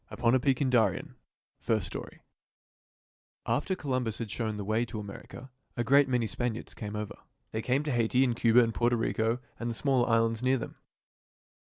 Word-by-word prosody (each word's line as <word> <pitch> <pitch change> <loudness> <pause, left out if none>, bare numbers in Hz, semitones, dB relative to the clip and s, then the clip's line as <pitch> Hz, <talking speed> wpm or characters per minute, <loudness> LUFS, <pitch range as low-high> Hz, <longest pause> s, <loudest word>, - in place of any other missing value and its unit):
"UPON 115 0 +1
A 130 - +5
PEAK 135 0 +1
IN 135 - +2
DARIEN" 110 -7 +2 0.5
FIRST 110 -4 0
STORY - - -7 1.2
After 190 - 0
Columbus 130 - -2
had 115 -4 -5
shown 110 -1 -2
the 100 - -4
way 110 +3 +1
to 110 -2 -5
America 105 +5 -9 0.3
a 120 - +1
great 140 +3 +5
many 125 -2 +1
Spaniards 115 +2 -3
came 105 -1 -6
over. 105 -1 -5 0.3
They 110 - -2
came 130 +5 +1
to 150 - -2
Haiti 120 +1 +3
and 125 -3 +1
Cuba 120 +1 +5
and 115 -1 -1
Porto 120 +2 +2
Rico 115 0 0 0.2
and 120 - -2
the 115 - -3
smaller 130 -2 +2
islands 115 0 +2
near 130 +1 +3
them. 115 - -6
120 Hz, 185 wpm, -29 LUFS, 110-130 Hz, 1.2 s, A